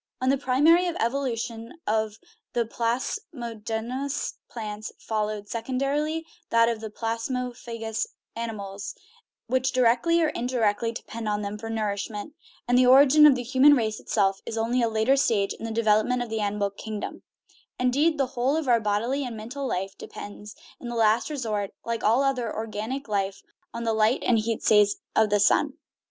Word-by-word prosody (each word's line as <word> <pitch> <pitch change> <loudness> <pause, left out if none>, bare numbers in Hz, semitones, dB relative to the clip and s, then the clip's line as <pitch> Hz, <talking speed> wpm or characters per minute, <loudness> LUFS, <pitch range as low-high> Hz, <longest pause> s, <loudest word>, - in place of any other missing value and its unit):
On 255 +1 +1
the 275 - +4
primary 305 +7 +4
evolution 235 -5 -2
of 215 -1 0 0.4
he 240 - +3
plasmodomous 235 - -3 0.2
plants 215 -2 -6
fol 215 -1 -1
lowed, 210 -1 -6
secondarily, 275 +8 -1 0.2
that 230 0 +4
of 230 -2 -1
the 220 - -5
plasmophagous 230 0 -3 0.3
animals, 205 -4 -5 0.5
which 260 +2 +1
directly 255 +7 +3
or 320 -2 +3
indirectly 235 -4 0
depend 225 -1 -6
on 210 0 -1
them 200 +1 -4
for 225 +1 -6
nour 215 -2 -1
ishment; 205 +5 -5 0.4
and 245 +1 +4
the 255 - +5
origin 285 +3 +8
of 280 - +6
the 250 - -3
human 265 +4 +6
race 220 -4 -1
itself 195 -2 +1
is 225 - -5
only 235 +3 +1
a 230 - +2
later 220 +4 +3
stage 220 -8 +2
in - - -8
the 225 - -3
development 225 +2 +2
of 235 - -9
the 220 - -1
animal 205 -1 -1
kingdom 210 +1 -6 0.6
Indeed, 285 +6 +2
the 275 - +2
whole 260 +5 +1
of 320 -4 -2
our 240 -2 +5
bodily 225 +6 0
and 240 -3 -5
mental 260 +6 -5
life 195 -3 -3
depends, 205 0 -9 0.2
in 240 - -7
the 240 - -4
last 225 +2 +3
resort, 220 -9 -3
like 230 -1 -2
all 230 +6 +4
other 255 -5 0
organic 225 +5 -4
life, 200 -2 -2 0.3
on 235 - -5
the 225 -1 +1
light 220 +3 +2
and 230 -2 +3
heat 225 0 -2
rays 210 -1 +5 0.2
of 220 -1 +4
the 205 0 +3
sun. 200 - +3
230 Hz, 170 wpm, -26 LUFS, 215-255 Hz, 0.6 s, origin